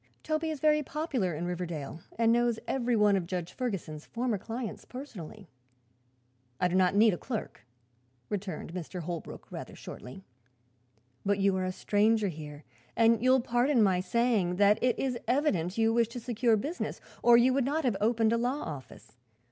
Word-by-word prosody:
Toby 310 +1 -1
is 310 -2 -4
very 300 +1 +4
popular 265 - -2
in 165 +3 -3
Riverdale 170 -4 -4 0.2
and 230 0 +4
knows 240 -1 +2
every 245 -2 0
one 210 -2 +4
of 180 -3 -1
Judge 180 -1 -4
Ferguson's 190 - -4
former 235 -3 -1
clients 230 +2 -5
personally." 215 - -9 1.1
"I 180 - +3
do 180 - -4
not 185 0 +3
need 215 0 +6
a 175 - -4
clerk," 220 - -6 0.6
returned 190 -4 -5
Mr. 180 0 -5
Holbrook, 170 0 -7
rather - - -7
shortly. 130 +10 -10 1.0
"But 200 0 +1
you 195 -1 +2
are 185 0 -1
a 185 - -1
stranger 210 +2 +2
here 150 -2 -8 0.3
and 230 -1 +4
you 255 - +4
will 260 0 +5
pardon 245 +1 +2
my 190 -3 +3
saying 200 -2 +1
that 205 +3 +4
it 250 -2 +2
is 255 -3 -1
evident 225 - +1
you 225 0 +3
wish 235 -1 +3
to 235 +2 -7
secure 235 -1 +1
business, 300 - -4 0.2
or 240 0 +7
you 250 +2 +4
would 275 0 +2
not 305 +4 0
have 245 -6 +1
opened 225 0 +3
a - - +2
law 255 +5 -1
office. 135 -6 -9
220 Hz, 175 wpm, -30 LUFS, 185-245 Hz, 1.1 s, or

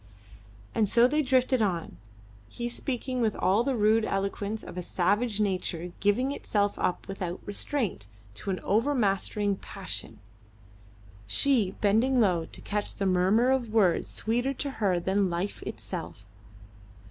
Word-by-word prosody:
And 215 -3 +2
so 235 +1 +5
they 300 +4 +2
drifted 260 -2 +2
on, 175 - -1 0.5
he 240 0 -4
speaking 255 0 -3
with 220 -2 +1
all 200 +5 +2
the 270 0 0
rude 220 0 +3
eloquence 200 +1 -2
of - - -9
a 180 - -3
savage 205 +6 0
nature 180 -4 -1
giving 230 +7 +2
itself 205 -7 -1
up 180 - -1
without 185 -2 -4
restraint 205 - -2 0.3
to 195 - -6
an 185 - -1
overmastering 205 -4 +1
passion, - - -7 1.1
she 210 - +2
bending 230 +6 +3
low 180 -7 +2
to - - -9
catch 210 0 -3
the 200 - -2
murmur 190 +7 +3
of 250 -4 0
words 190 -7 +3
sweeter 245 +5 0
to 280 +1 -3
her 185 -4 +2
than 190 +2 +1
life 175 +4 -3
itself. 100 - -6
205 Hz, 140 wpm, -28 LUFS, 190-240 Hz, 1.1 s, so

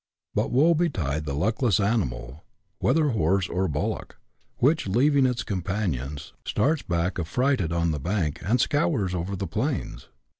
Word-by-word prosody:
But - - 0
woe 150 +7 +4
betide 90 - -1
the 70 -2 -3
luckless 110 - +1
animal, 80 - -1 0.4
whether 150 +4 +3
horse 95 - +1
or 95 +2 0
bul 75 -1 -1
lock, - - -7 0.4
which, 140 +1 +2
leaving 135 +6 +4
its 125 -1 -1
companions, 90 - -3
starts 155 +2 +1
back 85 +1 -1
affrighted 105 - 0
on 85 0 +1
the 75 - -2
bank, 85 -2 -1
and 115 +6 +2
scours 135 - +1
over 90 +2 -2
the 95 - -3
plains 120 - -3
100 Hz, 150 wpm, -26 LUFS, 85-130 Hz, 0.4 s, woe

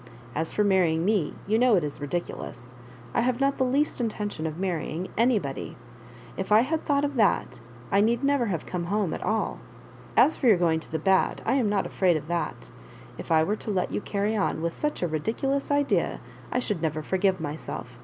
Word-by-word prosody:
As 160 +3 -1
for 210 - +1
marrying 175 -5 +2
me, 200 -7 +1
you 215 +3 +2
know 245 -2 +5
it 175 - +2
is 145 0 -5
ridi 160 +5 -1
culous. 120 -6 -9 0.4
I - - +2
have 245 +1 0
not 275 0 +1
the - - +4
least 270 +1 +1
intention 205 -7 -2
of 155 0 -5
marry 180 -4 -2
ing 170 +4 -4
anybody. 220 - 0 0.6
If 190 +2 -4
I 215 +1 +7
had 310 +6 -1
thought 285 0 +2
of 285 -2 -3
that, 210 -5 +2 0.3
I 200 - +4
need 235 +4 +2
never 280 -4 +2
have 170 -6 -2
come 175 -2 -3
home 195 -2 0
at - - -5
sJl. 220 0 -1 0.6
As 315 - +5
for 260 - +1
your 215 -5 +7
going 165 -2 +2
to 160 - -12
the 160 - 0
bad, 190 +4 +2
I - - +2
am 255 -6 +2
not 205 -2 +1
afraid 180 -4 +2
of 150 - -8
that. 155 - -3 0.5
If - - -7
I 160 -1 +5
were 210 +6 0
to - - -7
let 190 -3 0
you - - -2
carry 205 +2 -1
on 195 -5 0
with 170 0 -1
such 300 -9 -2
a - - +2
ridiculous 230 - -1
idea, 285 0 +1 0.3
I - - 0
should 210 -8 -1
never 155 -1 -1
forgive 190 +2 +1
myself. 145 -5 -6
195 Hz, 215 wpm, -26 LUFS, 165-235 Hz, 0.6 s, I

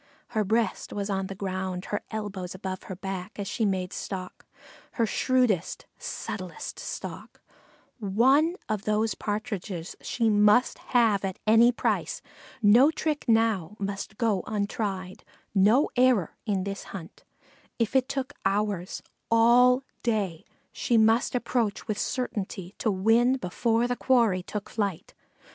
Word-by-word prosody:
Her 220 -3 0
breast 220 +3 0
was 200 0 -3
on 195 -1 -1
the 195 - -7
ground, 185 -1 -3
her 205 - 0
elbows 200 -4 -5
above 190 0 -5
her 190 - -6
back, 190 +2 -6
as 200 -1 -4
she 225 - -1
made 185 -2 -1
stalk, 185 -2 -6 0.5
her 230 - +1
shrewdest, 240 -6 +1
subtlest 450 - -6
stalk; - - -7 0.6
one 260 - +3
of 215 -1 -2
those 215 +1 +1
Partridges 205 -4 -4
she 230 -2 0
must 210 +3 +4 0.2
have 220 -5 +3
at 190 -1 -3
any 225 +3 +6
price; 240 - -1 0.4
no 235 +8 +7
trick 310 -1 -2
now 225 -5 +2
must 200 +1 -5
go 220 -6 +1
untried, 200 -3 -3 0.3
no 215 +8 +5
error 250 -9 +3
in 195 -3 0
this 195 0 -5
hunt; 170 -4 -9 0.5
if 230 +2 -1
it 265 0 +3
took 275 +1 -3
hours 195 -2 -1 0.3
all 245 +3 +5 0.2
day 200 -8 -1 0.3
she 235 - +1
must 225 +4 +3
approach 235 -4 -1
with 215 -2 -2
certainty 195 -7 -3
to 225 - +1
win 225 +6 +3
before 230 +2 0
the 245 - -1
quarry 235 -8 +3
took 205 +2 -5
to - - -15
flight. 200 -6 -2
210 Hz, 140 wpm, -27 LUFS, 195-235 Hz, 0.6 s, no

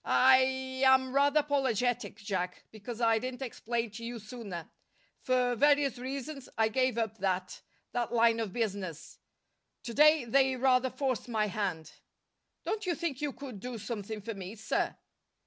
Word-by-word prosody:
I 260 0 +3
I 265 0 +8
am 260 -1 -2
rather 285 +2 +4
apologetic, 250 -6 0
Jack, 190 -4 -3
because 220 +2 -8
I 225 -1 +4
didn't 255 +2 -5
explain 235 -2 -3
to 230 +3 -9
you 235 +1 -5
sooner. 210 -6 -7 0.5
For 250 -1 +2
various 285 0 +3
reasons 275 +2 -6
I 220 0 +3
gave 255 +1 +1
up 220 -2 -2
that 185 -1 -2 0.3
that 240 -1 -2
line 230 -1 +4
of 220 -4 -2
business. 195 -7 -4 0.6
To 235 - -5
day 305 0 +6
they 265 +2 +3
rather 255 0 +3
forced 260 -3 -2
my 220 -2 +1
hand." 190 -6 -3 0.7
"Don't 430 -3 -3
you 345 - +1
think 320 -6 -3
you 295 -1 -1
could 260 -7 -9
do 245 +3 -5
something 215 0 -5
for 225 +3 -5
me, 195 +1 -7
sir?" 220 - -1
240 Hz, 160 wpm, -31 LUFS, 215-265 Hz, 0.7 s, I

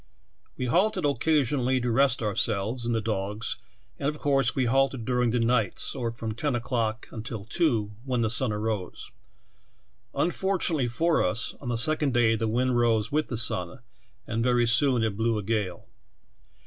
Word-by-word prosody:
We 125 - -2
halted 185 - +2
occasionally 140 -3 +1
to 120 -1 -1
rest 130 0 +2
ourselves 110 +3 -1
and 120 - +1
the 110 - 0
dogs, 105 +1 -3 0.4
and, 140 - 0
of 150 - -5
course, 135 -4 +1
we 130 - +1
halted 135 -1 +1
during 125 -1 +1
the 120 +2 +1
nights, 115 -4 0
or 120 -4 -3
from 115 -1 -5
ten 125 +5 -1
o'clock 120 -1 -2
until 110 -3 -6
two, 115 -5 0
when 130 -3 -1
the 110 - +1
sun 120 0 0
rose. 105 -3 -4 1.0
Unfortunately 175 -6 +1
for 160 +7 +1
us, 105 +5 -1
on 125 - -5
the 120 - 0
second 145 +1 +1
day 115 -2 +4
the 110 0 -1
wind 125 +2 +1
rose 115 0 +2
with 155 +1 +1
the 120 - -3
sun, 90 -1 -2 0.4
and 115 0 -2
very 120 -1 +3
soon 125 0 +3
it 110 -3 -1
blew 115 +1 0
a 105 - -3
gale. 100 -5 -2
120 Hz, 170 wpm, -27 LUFS, 110-135 Hz, 1.0 s, day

